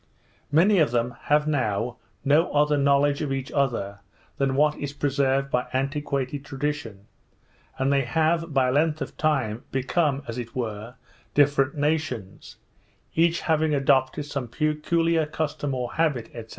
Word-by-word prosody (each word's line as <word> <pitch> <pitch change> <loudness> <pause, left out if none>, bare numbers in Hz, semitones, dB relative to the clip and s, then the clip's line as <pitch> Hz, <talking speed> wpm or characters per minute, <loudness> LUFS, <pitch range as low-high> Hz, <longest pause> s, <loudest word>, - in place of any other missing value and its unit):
Many 185 +6 +5
of 155 - +4
them 120 0 -1
have 150 +1 +3
now 120 -4 -1 0.3
no 150 +5 +3
other 150 0 +3
knowledge 140 +1 +2
of 145 -3 -2
each 135 0 -3
other, 115 -8 -1 0.4
than 135 -1 +1
what 150 +2 +3
is 145 -1 -5
preserved 135 -1 0
by 125 - 0
antiquated 140 0 -2
tradition; 135 -8 -4 0.7
and 135 +1 +1
they 140 - +3
have, 160 +5 0
by 130 -2 +2
length 150 +3 +1
of - - -10
time, 135 -7 0
become, 140 +1 0
as 115 +1 -4
it 115 -1 -7
were, 115 -1 -4 0.4
different 145 -1 +3
nations, 145 -10 -2 0.6
each 170 +1 +2
having 160 -2 +1
adopted 135 +1 +2
some 140 -4 -4
peculiar 155 +4 0
custom 145 -2 -3
or 125 -1 -3
habit, 145 -8 0
&c. 115 -2 -7
140 Hz, 145 wpm, -25 LUFS, 130-150 Hz, 0.7 s, Many